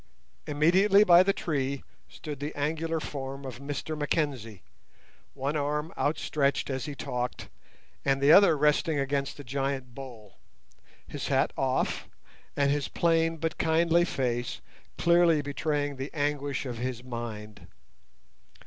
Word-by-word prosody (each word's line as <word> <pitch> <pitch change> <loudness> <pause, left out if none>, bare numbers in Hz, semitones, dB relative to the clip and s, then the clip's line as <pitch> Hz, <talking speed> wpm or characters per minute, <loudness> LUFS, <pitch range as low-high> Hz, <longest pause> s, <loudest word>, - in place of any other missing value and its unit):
Immediately 185 +8 +5
by 175 -3 +7
the 195 +1 +3
tree 140 -7 -2 0.3
stood 150 -3 -8
the 145 +2 -5
angular 160 +3 -1
form 135 -2 -6
of 125 -2 -7
Mr 145 +2 -4
Mackenzie, 140 - -2 0.7
one 140 +2 -2
arm 150 +2 -2
outstretched 145 -2 0
as 130 -2 -3
he 145 - -6
talked, 125 -2 -4 0.5
and 135 -1 +2
the 140 +2 +5
other 170 -3 +7
resting 150 +2 +2
against 140 0 -1
the 145 - -8
giant 135 -1 -3
bole, 115 -6 -11 0.7
his - - -5
hat - - +1
off, - - -1 0.5
and 140 -1 +3
his 145 -1 0
plain 165 -1 +1
but 165 0 -3
kindly 165 +1 +3
face 120 -7 -2 0.4
clearly 170 -2 +4
betraying 145 0 -2
the 135 +2 -4
anguish 145 -2 -1
of 120 -3 -5
his 125 -1 -4
mind. 115 -4 -7
145 Hz, 130 wpm, -28 LUFS, 135-160 Hz, 0.7 s, by